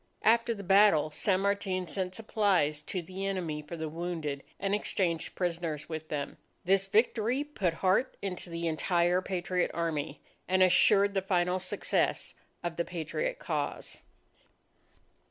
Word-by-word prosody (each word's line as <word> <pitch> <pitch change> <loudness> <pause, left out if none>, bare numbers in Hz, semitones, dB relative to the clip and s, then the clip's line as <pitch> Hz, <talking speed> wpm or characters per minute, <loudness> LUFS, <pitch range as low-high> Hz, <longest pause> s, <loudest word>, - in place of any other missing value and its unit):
After 230 +1 +3
the 200 - -8
battle, 195 -5 +5
San 185 +4 +1
Martin 195 -2 0
sent 185 +1 -2
supplies 195 -9 +1
to 180 +3 -4
the 185 +3 -6
enemy 170 -6 -2
for 165 +3 -8
the 160 0 -3
wounded, 160 -3 -4 0.2
and 195 0 -1
exchanged 180 -5 0
prisoners 170 -4 -2
with 160 -1 -5
them. 145 -2 -4 0.3
This 195 +1 +3
victory 230 +5 +2
put 200 - -2
heart 190 +9 +1
into 185 -2 -5
the 170 0 -3
entire 175 +3 +2
Patriot 180 -1 -1
Army, 155 -3 -2 0.3
and 185 0 +4
assured 200 +2 +5
the 195 - +1
final 180 -1 +1
success 185 - -1 0.3
of 170 -1 -3
the 170 - +1
Patriot 180 - -3
cause. - - -4
180 Hz, 140 wpm, -30 LUFS, 165-195 Hz, 0.3 s, battle